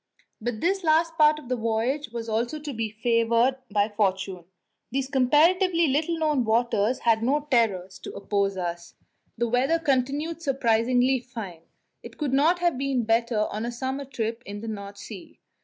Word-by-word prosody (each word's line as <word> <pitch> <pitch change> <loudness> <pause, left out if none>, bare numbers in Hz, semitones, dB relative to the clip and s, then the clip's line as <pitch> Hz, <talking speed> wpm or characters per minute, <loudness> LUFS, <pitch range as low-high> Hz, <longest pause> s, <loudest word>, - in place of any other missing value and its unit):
But 225 -1 -3
this 385 +2 +1
last 325 +1 +2
part 305 -1 +5
of 300 -5 -11
the 255 - 0
voyage 230 +5 -1
was 230 0 -6
also 235 +6 -1
to 295 -1 -6
be 225 -1 -2
favoured 230 +3 +2
by 205 0 +2
fortune. 195 -4 -1 0.4
These 265 +2 -2
comparatively 335 +7 +4
little 310 +4 0
known 305 -5 +1
waters 230 0 +1
had 225 -1 +2
no 285 +5 +1
terrors 190 -6 +1
to - - -8
oppose 200 -1 -1
to 185 - -3
us. 170 0 -6 0.4
The 235 +1 0
weather 255 +7 +2
continued 295 +2 -1
surprisingly 250 -2 +2
fine; 225 -9 -8 0.4
it - - -12
could 290 -4 -2
not 310 +6 +4
have 345 -6 0
been 270 -3 0
better 225 -1 +1
on 215 +2 -3
a 240 - -3
summer 265 +3 -4
trip 230 -3 -4
in 205 +1 -6
the 225 - -7
North 200 -2 -6
Sea. 200 -1 -11
240 Hz, 175 wpm, -25 LUFS, 220-285 Hz, 0.4 s, part